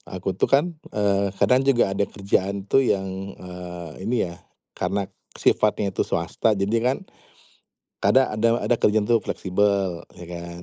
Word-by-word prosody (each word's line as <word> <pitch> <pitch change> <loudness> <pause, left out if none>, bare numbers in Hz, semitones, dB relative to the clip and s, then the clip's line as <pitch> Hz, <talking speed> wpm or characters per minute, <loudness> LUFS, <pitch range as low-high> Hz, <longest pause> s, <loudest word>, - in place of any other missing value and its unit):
aku 95 0 -4
tuh - - +3
kan, 160 +5 +3 0.2
eee, 100 -1 +1
kadang 130 +1 +4
juga 120 -7 +3
ada 100 - +1
kerjaan 100 0 -1
tuh 135 +6 +4
yang, 95 -6 +1 0.3
eee, 90 -2 -8 0.2
ini 120 +2 +1
ya, 85 0 -9 0.4
karena 100 -1 -1 0.3
sifatnya 105 -1 +2
itu - - +1
swasta, 95 +5 0
jadi 100 +3 0
kan 130 +2 +1 1.0
kadang 130 0 +5
ada 115 +2 +2
ada 120 - +2
kerjaan 105 0 +2
tuh 115 - +6
fleksibel, 95 -2 0 0.2
ya 90 - -9
kan? 85 0 -7
100 Hz, 155 wpm, -24 LUFS, 90-115 Hz, 1.0 s, tuh